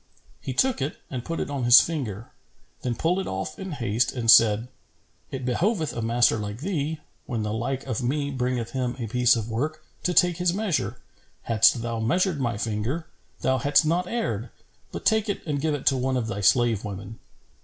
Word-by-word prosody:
He -, -, -5 dB
took 245 Hz, -, +1 dB
it 140 Hz, +3 st, -2 dB
and 125 Hz, -3 st, -4 dB
put 165 Hz, +4 st, -4 dB
it -, -, -3 dB
on 140 Hz, -3 st, -2 dB
his 120 Hz, +2 st, +9 dB
finger; 120 Hz, -, -3 dB, 0.5 s
then 125 Hz, -2 st, -2 dB
pulled 170 Hz, +9 st, +1 dB
it 190 Hz, -, -3 dB
off 95 Hz, +11 st, -4 dB
in 190 Hz, -3 st, -5 dB
haste 120 Hz, -3 st, 0 dB
and 115 Hz, -3 st, +4 dB
said, 110 Hz, +1 st, +6 dB, 0.6 s
"It 130 Hz, -2 st, -5 dB
behoveth 160 Hz, -, 0 dB
a 120 Hz, -, -4 dB
master 115 Hz, +1 st, +3 dB
like 105 Hz, +3 st, -5 dB
thee, 160 Hz, -3 st, -2 dB, 0.3 s
when 115 Hz, -4 st, -2 dB
the 105 Hz, 0 st, -2 dB
like 125 Hz, +4 st, -3 dB
of 130 Hz, -2 st, -3 dB
me 140 Hz, +3 st, -1 dB
bringeth 125 Hz, -3 st, -2 dB
him 125 Hz, -2 st, -2 dB
a 120 Hz, -, -4 dB
piece 125 Hz, +2 st, +3 dB
of 115 Hz, -2 st, -3 dB
work, 155 Hz, +7 st, -3 dB, 0.2 s
to 180 Hz, -, 0 dB
take 180 Hz, -3 st, +4 dB
his 180 Hz, 0 st, +1 dB
measure. 205 Hz, -6 st, -1 dB, 0.4 s
Hadst 115 Hz, +1 st, +4 dB
thou 115 Hz, -1 st, -3 dB
measured 155 Hz, -, +1 dB
my 120 Hz, -4 st, -1 dB
finger, 115 Hz, +10 st, -2 dB, 0.4 s
thou 130 Hz, 0 st, +1 dB
hadst 145 Hz, +4 st, +3 dB
not 175 Hz, +3 st, +1 dB
erred; 120 Hz, -, -2 dB, 0.4 s
but -, -, -7 dB
take 220 Hz, -1 st, +2 dB
it 200 Hz, -, -3 dB
and 145 Hz, -4 st, -2 dB
give 155 Hz, -1 st, 0 dB
it 145 Hz, -, -7 dB
to 135 Hz, -, +3 dB
one 130 Hz, +1 st, 0 dB
of 120 Hz, -, -1 dB
thy 105 Hz, -2 st, -4 dB
slave 115 Hz, +1 st, +3 dB
women." 100 Hz, +2 st, -7 dB
130 Hz, 200 wpm, -25 LUFS, 115-155 Hz, 0.6 s, his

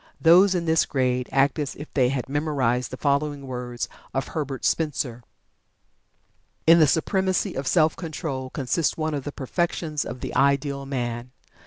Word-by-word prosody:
Those 185 Hz, +4 st, +6 dB
in 170 Hz, -1 st, -1 dB
this 160 Hz, 0 st, +3 dB
grade 125 Hz, -2 st, 0 dB
act 140 Hz, +3 st, +2 dB
as 145 Hz, -2 st, -3 dB
if 150 Hz, -, -10 dB
they 130 Hz, -3 st, +3 dB
had 130 Hz, -2 st, -2 dB
memorized 135 Hz, -4 st, 0 dB
the 130 Hz, -, -7 dB
following 140 Hz, 0 st, 0 dB
words 125 Hz, -2 st, -4 dB, 0.3 s
of 135 Hz, -, -1 dB
Herbert 140 Hz, -4 st, -4 dB
Spencer: 135 Hz, -6 st, -1 dB, 1.4 s
"In 165 Hz, +2 st, +7 dB
the 155 Hz, -, +6 dB
supremacy 185 Hz, +5 st, +1 dB
of 135 Hz, 0 st, -4 dB
self 155 Hz, -1 st, +3 dB
control 150 Hz, -6 st, -5 dB
consists 140 Hz, +4 st, -1 dB
one 155 Hz, -1 st, -1 dB
of 140 Hz, -3 st, -3 dB
the 145 Hz, -, -3 dB
perfections 155 Hz, +2 st, -2 dB
of 125 Hz, -, -7 dB
the -, -, -5 dB
ideal 140 Hz, +1 st, +1 dB
man. 120 Hz, -2 st, -3 dB
140 Hz, 160 wpm, -24 LUFS, 130-155 Hz, 1.4 s, In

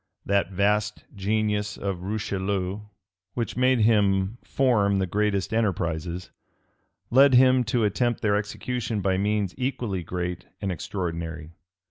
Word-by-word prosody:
That 100 Hz, 0 st, +1 dB
vast 105 Hz, +2 st, 0 dB
genius 105 Hz, +1 st, -1 dB
of 95 Hz, -3 st, -3 dB
Richelieu, 100 Hz, -1 st, -2 dB, 0.6 s
which 115 Hz, -4 st, -2 dB
made 130 Hz, -1 st, +3 dB
him 105 Hz, -1 st, +2 dB
form 105 Hz, -7 st, +2 dB
the 95 Hz, -, +1 dB
greatest 100 Hz, +1 st, 0 dB
enterprises, 90 Hz, -5 st, -1 dB, 0.8 s
led 135 Hz, +1 st, +6 dB
him 130 Hz, 0 st, +6 dB
to 120 Hz, 0 st, +1 dB
attempt 120 Hz, +3 st, 0 dB
their 100 Hz, -1 st, +2 dB
execution 110 Hz, +1 st, -2 dB
by 95 Hz, 0 st, +1 dB
means 105 Hz, -2 st, 0 dB
equally 120 Hz, -7 st, -2 dB
great 90 Hz, +1 st, -4 dB
and 100 Hz, -2 st, -2 dB
extraordinary. 85 Hz, -3 st, -4 dB
100 Hz, 120 wpm, -25 LUFS, 95-110 Hz, 0.8 s, led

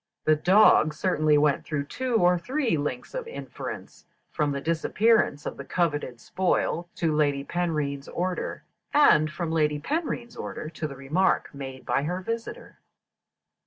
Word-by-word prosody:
The 155 Hz, -, +5 dB
dog 175 Hz, -2 st, +5 dB
certainly 155 Hz, -3 st, +2 dB
went 145 Hz, -1 st, +2 dB
through 150 Hz, -3 st, -2 dB
two 250 Hz, -, -3 dB
or 180 Hz, -4 st, +4 dB
three 255 Hz, -, 0 dB
links 145 Hz, -4 st, -4 dB
of -, -, -4 dB
inference, 465 Hz, -, -8 dB, 0.2 s
from 150 Hz, -1 st, 0 dB
the 140 Hz, -, -2 dB
disappearance 165 Hz, +1 st, +2 dB
of -, -, -5 dB
the 140 Hz, -, -6 dB
coveted 145 Hz, -6 st, -1 dB
spoil 175 Hz, +2 st, -1 dB
to 160 Hz, -3 st, 0 dB
Lady 145 Hz, -2 st, +1 dB
Penrhyn's 150 Hz, -5 st, -2 dB
order, 180 Hz, +1 st, -3 dB, 0.3 s
and 155 Hz, -, +6 dB
from 170 Hz, 0 st, -3 dB
Lady 150 Hz, -2 st, +1 dB
Penrhyn's 250 Hz, -, -3 dB
order 155 Hz, -, -6 dB
to 155 Hz, -1 st, -4 dB
the 140 Hz, -, -9 dB
remark 145 Hz, +9 st, 0 dB
made 135 Hz, -2 st, -8 dB
by -, -, +1 dB
her 175 Hz, +5 st, -2 dB
visitor. 230 Hz, -, -6 dB
160 Hz, 150 wpm, -26 LUFS, 145-190 Hz, 0.3 s, and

